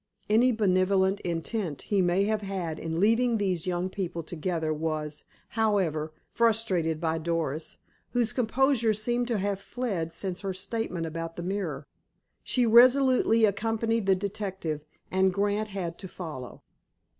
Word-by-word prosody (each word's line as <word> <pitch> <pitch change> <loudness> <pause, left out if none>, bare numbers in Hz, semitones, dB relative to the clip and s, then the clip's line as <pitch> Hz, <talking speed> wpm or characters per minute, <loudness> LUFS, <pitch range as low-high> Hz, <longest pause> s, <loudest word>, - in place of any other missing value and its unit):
Any 240 +4 +5
benevolent 190 -2 +2
intent 170 -1 -3
he 200 -2 +1
may 180 +2 +2
have 215 +1 0
had 185 -5 -4
in 165 0 -3
leaving 230 +4 +3
these 185 -5 -1
young 180 0 0
people 180 -3 -4
together 160 -1 -2
was, 155 -1 -3 0.2
however, 190 -9 0 0.2
frustrated 200 -9 +1
by 160 0 0
Doris, 160 -2 -2 0.3
whose 240 -3 0
composure 245 -1 +2
seemed 240 +3 0
to 235 -3 0
have 200 0 -1
fled 200 -9 -3
since 185 +1 -4
her 195 -2 -3
statement 190 -3 -3
about 165 +1 -5
the 175 - -5
mirror. 175 -7 -3 0.6
She 250 -2 +1
resolutely 245 -1 +6
accompanied 225 +1 0
the 190 - +5
detective, 190 -6 -4 0.3
and 190 0 +3
Grant 205 +3 0
had 185 -5 -5
to 190 - -7
follow. 155 -9 -8
190 Hz, 140 wpm, -28 LUFS, 165-220 Hz, 0.6 s, resolutely